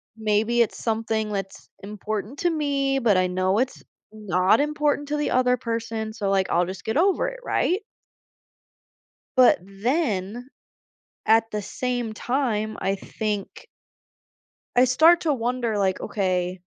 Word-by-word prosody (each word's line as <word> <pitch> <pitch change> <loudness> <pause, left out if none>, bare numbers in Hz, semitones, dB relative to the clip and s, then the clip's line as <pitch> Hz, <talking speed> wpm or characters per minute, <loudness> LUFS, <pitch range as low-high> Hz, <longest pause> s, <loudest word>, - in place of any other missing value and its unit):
Maybe 220 +2 +1
it's 230 - 0
something 220 -1 -1
that's 195 -1 -6
important 210 +5 -5
to 350 - +2
me, 280 -3 0
but 215 -6 +3
I 185 0 +2
know 185 +2 0
it's 260 +1 -2 0.3
not 200 - +2
important 295 -1 0
to 300 - -1
the 295 - -1
other 250 0 +3
person, 225 -1 -4
so, 205 -4 -2
like, 195 -1 +1
I'll 175 +1 +2
just 185 0 -8
get 220 +6 -1
over 385 +7 +2
it, - - -6
right. 380 -2 0 1.6
But 250 -8 +6
then 215 - -2 0.8
at 225 0 +4
the 210 - -3
same 245 +1 -3
time, 220 -3 -2
I 195 +1 0
think. 205 0 -5 1.1
I 250 +1 +6
start 320 +7 +5
to 310 -3 +1
wonder 240 -3 -1
like, 190 -2 +1
“Okay“ 185 -2 -1
225 Hz, 140 wpm, -24 LUFS, 200-260 Hz, 1.6 s, But